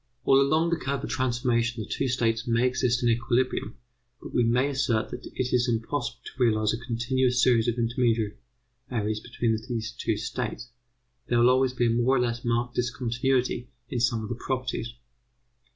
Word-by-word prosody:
All 135 0 +6
along 155 +4 +2
the 170 - +2
curve 140 0 -3
of - - -4
transformation 120 -3 0
the - - -10
two 135 - -1
states 115 -1 0
may 115 +1 +2
exist 125 -1 +1
in 120 - +3
equilibrium, 120 +1 0 0.4
but - - -10
we 120 - +3
may 125 +4 +2
assert 130 -5 0
that - - -7
it 125 -1 -3
is 125 0 +3
impossible 120 +2 -2
to 130 - -2
realize 110 -2 +2
a 115 - -3
continuous 125 +1 0
series 115 -3 +4
of 120 0 0
intermediaries 115 -1 -2
between 115 0 -1
these 115 -2 -3
two 115 -2 -2
states. 120 +2 -4 0.6
There 120 - +2
will 120 +1 +6
always 130 0 +2
be 120 -1 +1
a - - +3
more 120 +3 +2
or - - +2
less 120 -1 -1
marked 120 +1 0
discontinuity 125 +1 0 0.2
in 125 - -2
some 115 -2 +1
of 105 - -6
the - - -1
properties. 125 -1 -3
120 Hz, 180 wpm, -27 LUFS, 115-125 Hz, 0.6 s, All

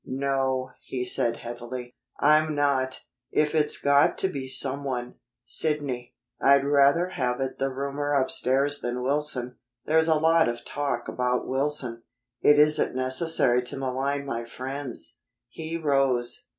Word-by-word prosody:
"No," 130 -1 -1
he 125 -1 -4
said 120 -2 -1
heavily, 120 +1 -7 0.3
"I'm 155 +1 +4
not. 135 -3 0 0.3
If 150 0 +1
it's 150 -1 +1
got 140 0 +3
to 190 - 0
be 135 -6 -5
someone, 130 -1 0 0.3
Sidney, 140 -3 -2 0.3
I'd 140 0 +5
rather 145 +5 +4
have 125 -7 -2
it 130 -1 -3
the 135 0 0
roomer 140 +2 -3
upstairs 135 +1 +1
than 125 +1 -3
Wilson. 130 -3 -2 0.3
There's 160 +1 +3
a 160 - +4
lot 160 -1 +3
of 120 0 -6
talk 140 -4 -3
about 125 0 -1
Wilson." 130 -3 -2 0.4
"It 145 - +6
isn't 150 -3 +3
necessary 130 -1 +1
to 125 - -4
malign 135 +2 -2
my 120 -4 -3
friends." 130 +2 -7 0.3
He 160 +5 -5
rose. 135 -6 0
135 Hz, 135 wpm, -26 LUFS, 125-145 Hz, 0.4 s, It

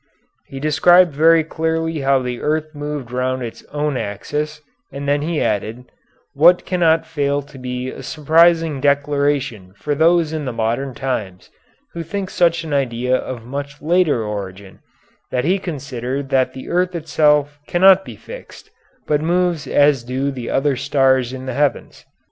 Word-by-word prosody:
He 135 - -8
described 175 +3 +4
very 160 +2 +5
clearly 160 0 -2
how 135 -1 +2
the 125 -1 -4
earth 155 +1 -1
moved 145 -4 -5
round 130 0 -1
its 115 - -8
own 150 -2 -2
axis, 150 +9 -4 0.3
and 140 +1 -6
then 145 +1 +1
he 160 +1 -1
added, 110 +4 -2 0.4
what 170 +5 +5
cannot 165 -3 +2
fail 145 -3 -1
to 140 0 -15
be 125 0 -4
a - - -9
surprising 160 -1 +2
declaration 140 -8 0
for 150 - -2
those 160 +1 +3
in 155 -2 -3
the 130 - -2
modern 120 +3 -2
times 105 -9 -4 0.4
who 170 - -5
think 190 +3 -5
such 170 -1 +2
an 155 -2 -5
idea 125 -2 0
of 125 -3 -5
much 140 +2 -6
later 160 -7 +2
origin, 100 -2 -7 0.5
that 125 +1 -1
he 190 +4 +2
considered 135 -5 -5
that 130 -2 +1
the 130 - -9
earth 180 +1 0
itself 150 -2 +1
cannot 190 +2 +5
be - - -10
fixed, - - -12 0.3
but 150 -1 +1
moves 175 -1 0
as 145 -3 +3
do 130 +3 -2
the 125 -3 -6
other 135 0 +1
stars 130 -2 +2
in 130 0 -7
the 130 - -4
heavens. 145 +1 -2
145 Hz, 160 wpm, -19 LUFS, 130-160 Hz, 0.5 s, very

